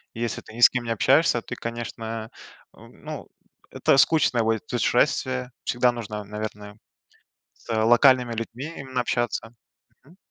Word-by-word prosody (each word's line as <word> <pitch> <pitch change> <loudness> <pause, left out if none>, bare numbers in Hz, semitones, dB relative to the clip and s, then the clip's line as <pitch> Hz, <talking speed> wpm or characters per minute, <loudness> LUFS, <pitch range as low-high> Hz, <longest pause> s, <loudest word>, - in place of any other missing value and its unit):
Если 115 0 -3
ты - - -15
ни 120 - -9
с - - +9
кем 125 -2 -3
не 115 - -4
общаешься, 115 - +3
ты, - - -7
конечно, 115 -1 -6 0.5
э, - - -30
ну - - -10 0.4
это 135 - +2
скучное 135 -7 +3
будет 110 -1 -1
путешествие, 65 0 0
всегда 125 0 +2
нужно, 105 -3 -6
наверное, 105 0 -7 0.8
с 115 - -8
локальными 120 +1 +5
людьми 115 +4 -5
именно 130 -2 -3
общаться. 120 -1 -2 0.5
Мгм. 160 +6 -20
115 Hz, 140 wpm, -24 LUFS, 110-125 Hz, 0.8 s, с